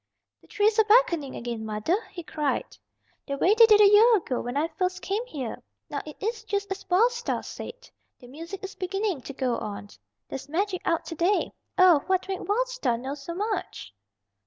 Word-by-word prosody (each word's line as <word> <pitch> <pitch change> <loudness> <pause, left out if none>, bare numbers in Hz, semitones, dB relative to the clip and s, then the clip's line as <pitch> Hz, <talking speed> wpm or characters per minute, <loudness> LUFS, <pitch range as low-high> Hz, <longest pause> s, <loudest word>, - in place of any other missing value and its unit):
"The - - -22
trees 420 +1 +2
are - - +7
beckoning 410 - +3
again, 235 -2 -5
mother," 215 - 0
he 350 -3 -8
cried. 300 -3 -2 0.5
"The 280 -1 -3
way 365 +8 +4
they 455 +1 +7
did 425 -2 +6
a 410 - +9
year 435 +3 +7
ago 265 -9 -3
when 245 +3 -4
I 310 +3 +1
first 365 +3 -2
came 405 +4 -1
here. 265 - -5 0.3
Now - - -2
it 300 - -9
is 445 +2 -3
just 405 -1 -3
as 385 - -6
Wild 425 +7 +4
Star 480 0 -3
said. - - -9 0.3
The 250 - -15
music 330 +10 -9
is 390 - -6
beginning 390 -4 -2
to 275 - -8
go 255 -3 -1
on. 205 -1 -6 0.4
There's 270 +1 -7
magic 370 +3 -1
out 330 - 0
to - - -6
day. 350 +5 +1 0.3
Oh, 365 -5 +7
what 375 0 +1
made 385 -1 -3
Wild 475 +5 +1
Star - - -1
know 260 +3 -5
so 295 +4 -7
much?" 390 - -4
365 Hz, 200 wpm, -26 LUFS, 280-415 Hz, 0.5 s, a